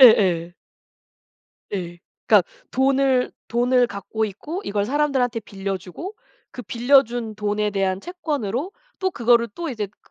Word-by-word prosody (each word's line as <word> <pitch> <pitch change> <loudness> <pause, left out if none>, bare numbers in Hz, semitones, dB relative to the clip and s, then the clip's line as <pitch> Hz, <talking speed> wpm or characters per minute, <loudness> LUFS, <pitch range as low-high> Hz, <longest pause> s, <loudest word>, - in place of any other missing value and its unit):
예예. 180 -8 +6 1.2
예. 175 -3 -4 0.3
그러니까 - - +5 0.2
돈을 265 -1 +2 0.2
돈을 245 +1 +3
갖고 220 +1 -3
있고 300 - -5
이걸 200 0 0
사람들한테 260 -3 +1
빌려주고 195 - -5 0.4
그 250 - -8
빌려준 240 -3 +2
돈에 210 0 0
대한 195 -1 0
채권으로 300 - -3 0.3
또 375 -1 0
그거를 235 -4 +3
또 340 -2 -4
이제 220 -5 -3
그 200 - -28
235 Hz, 275 characters per minute, -23 LUFS, 200-270 Hz, 1.2 s, 예예